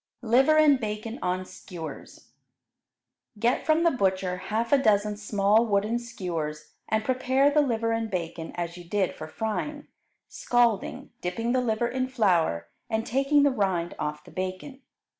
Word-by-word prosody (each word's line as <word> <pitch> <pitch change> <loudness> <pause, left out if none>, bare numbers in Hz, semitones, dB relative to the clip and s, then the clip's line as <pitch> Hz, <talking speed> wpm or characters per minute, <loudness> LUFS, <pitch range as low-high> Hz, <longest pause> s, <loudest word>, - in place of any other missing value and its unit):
Liver 265 +7 +4
and 295 -3 +6
Bacon 220 +1 -4
on 185 +1 -1
Skewers 175 -3 -10 1.1
Get 235 +4 +1
from 315 +1 +4
the 335 - +4
butcher 190 -6 0
half 230 +4 0
a - - +8
dozen 210 -3 +2
small 210 +2 +2
wooden 210 +3 +1
skewers, 165 -10 -5 0.2
and 220 0 +1
prepare 260 +2 +2
the 300 +1 +4
liver 230 -4 0
and 225 -1 -1
bacon 170 -3 -4
as 175 0 -4
you 175 - -9
did 190 +2 0
for 155 - -8
frying, 260 - -3 0.4
scalding, 235 -4 0
dipping 225 +7 -2
the 255 0 +2
liver 235 -1 0
in 255 +1 -1
flour, 175 - +1 0.2
and 220 0 -1
taking 275 +4 +3
the 285 - +4
rind 190 -7 0
off 150 0 -3
the - - -15
bacon. 185 +9 -5
220 Hz, 155 wpm, -27 LUFS, 185-250 Hz, 1.1 s, a